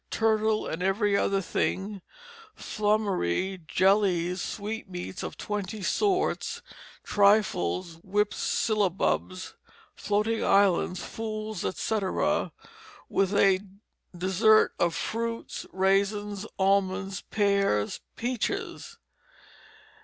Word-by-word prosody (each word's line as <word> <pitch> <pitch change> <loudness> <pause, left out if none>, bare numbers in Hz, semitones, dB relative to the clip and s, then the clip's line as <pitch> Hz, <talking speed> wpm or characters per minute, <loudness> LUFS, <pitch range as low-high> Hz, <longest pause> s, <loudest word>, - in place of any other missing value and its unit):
Turtle 220 -1 +1
and 165 - -4
every 200 +2 +2
other 195 0 +1
thing, 195 +2 -2 0.5
flummery, 195 - 0
jellies, 185 -2 +2
sweetmeats 200 -4 -5
of - - -6
twenty 205 0 -4
sorts, 385 - 0 0.4
trifles, 190 - +2
whipped 205 +2 +1
sillabubs, 90 - 0 0.4
floating 215 +2 0
islands, 185 -2 +3
fools, 215 -3 -5
etc., 200 0 0 0.6
with 195 +1 +1
a 195 -2 +5 0.6
dessert 195 +5 +4
of 170 -1 +1
fruits, 230 +1 -4
raisins, 200 +2 0
almonds, 195 0 +1
pears, 200 - +1 0.2
peaches." 255 - -3
200 Hz, 80 wpm, -27 LUFS, 185-215 Hz, 0.6 s, a